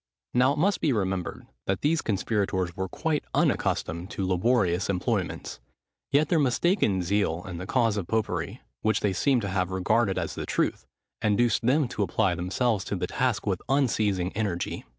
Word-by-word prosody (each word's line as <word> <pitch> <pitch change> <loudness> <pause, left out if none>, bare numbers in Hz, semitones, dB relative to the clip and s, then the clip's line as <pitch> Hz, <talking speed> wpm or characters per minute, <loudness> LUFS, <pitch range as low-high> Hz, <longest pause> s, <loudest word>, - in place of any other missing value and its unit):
Now 125 +3 +4
it - - -6
must 195 +6 +2
be 150 - +2
remembered, 95 -4 -2 0.2
that 95 -1 0
these 155 +2 +2
conspirators 95 -4 -1
were 95 -1 -3
quite 155 - -1
unaccustomed 85 +4 0
to 95 - -3
laborious 95 -1 +2
employments: 90 -2 -2 0.5
yet 145 +2 +4
their 170 - +2
mistaken 130 - +2
zeal 90 -2 0
in 90 -3 -6
the 90 - -6
cause 115 -5 +2
of 95 -4 -3
popery, 110 -1 -2 0.2
which 110 -1 +1
they 100 -2 +1
seem 130 +6 +2
to 100 - -3
have 90 -1 0
regarded 95 +2 +1
as - - -2
the - - -5
truth, - - -1 0.3
induced 110 +2 +2
them 135 +4 +3
to - - -3
apply - - +1
themselves 95 +4 0
to - - -2
the - - -1
task - - -1
with - - -1
unceasing 105 -9 +1
energy. 100 -5 -2
105 Hz, 170 wpm, -27 LUFS, 95-125 Hz, 0.5 s, Now